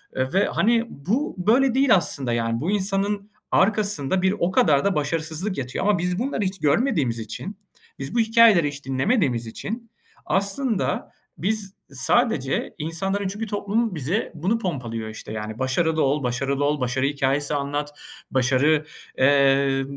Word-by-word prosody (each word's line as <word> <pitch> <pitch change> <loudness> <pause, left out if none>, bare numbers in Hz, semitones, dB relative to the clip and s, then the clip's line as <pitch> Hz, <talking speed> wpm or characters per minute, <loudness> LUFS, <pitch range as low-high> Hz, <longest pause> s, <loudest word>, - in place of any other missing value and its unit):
eee, 130 +3 -1
ve 195 +2 +3
hani 230 +2 +2
bu 225 - -2
böyle 240 +8 +3
değil 265 -4 +5
aslında 135 -9 0
yani. 115 0 -1
Bu 175 - -1
insanın 200 +1 -1 0.2
arkasında 195 -5 +2
bir 190 +2 +2
o 175 - +1
kadar 145 -6 +3
da 200 - +2
başarısızlık 160 +5 -2
yatıyor 130 +7 -3
ama 210 - +3
biz 180 +1 -1
bunları 255 -1 -2
hiç 190 0 -3
görmediğimiz 150 - +1
için, 115 - -7 0.4
biz 135 - -5
bu - - +3
hikâyeleri 225 -7 +5
hiç 145 0 -7
dinlemediğimiz 130 - 0
için 225 - -6 0.3
aslında 200 +3 -1 0.3
biz 200 +1 -2 0.2
sadece 140 - +1
insanların 190 +6 -2
çünkü 205 +4 -4
toplum 210 +1 -1
bize 160 - -2
bunu 190 +9 0
pompalıyor 120 - -4
işte, 110 0 -9
yani. 110 +1 -5
Başarılı 155 +5 +1
ol, 140 +1 +1
başarılı 135 +3 -1
ol, 145 0 0
başarı 130 +2 0
hikâyesi 140 +1 0
anlat, 145 +1 -2 0.4
başarı, 135 +4 +2 0.3
eee, 135 0 +3
160 Hz, 145 wpm, -23 LUFS, 135-205 Hz, 0.4 s, değil